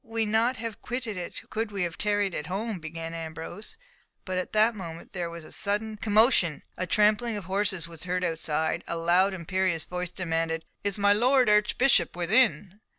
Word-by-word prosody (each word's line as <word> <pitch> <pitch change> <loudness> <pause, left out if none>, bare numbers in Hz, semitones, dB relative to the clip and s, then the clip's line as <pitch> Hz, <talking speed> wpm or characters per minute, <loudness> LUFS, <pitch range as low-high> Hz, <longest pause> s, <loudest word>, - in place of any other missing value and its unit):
"We'd 225 -1 -2
not 230 +4 +2
have 225 -2 -6
quitted 245 -4 -4
it 180 -1 -5
could 225 0 -2
we 200 -3 -1
have 175 -1 -3
tarried 205 -2 +1
at 150 - -4
home," 200 +2 -3
began 165 +1 -6
Ambrose; 165 +5 -7 0.5
but 185 -1 -1
at 185 - -4
that 220 +2 +4
moment 170 -5 -8
there 175 -3 -3
was 170 -1 -9
a - - -13
sudden 215 +2 -2
commotion, 210 - +3
a 185 - -3
trampling 215 +4 +3
of 205 - -6
horses 190 -3 0
was 165 0 -8
heard 180 0 -1
outside, 160 -2 -1
a 170 - -2
loud 175 +4 +3
imperious 185 -1 0
voice 180 +1 -4
demanded, 165 -2 -2 0.2
"Is 200 0 -1
my 205 0 +5
Lord 250 +2 +4
Archbishop 210 -2 +3
within?" 190 0 +2
190 Hz, 180 wpm, -27 LUFS, 170-215 Hz, 0.5 s, my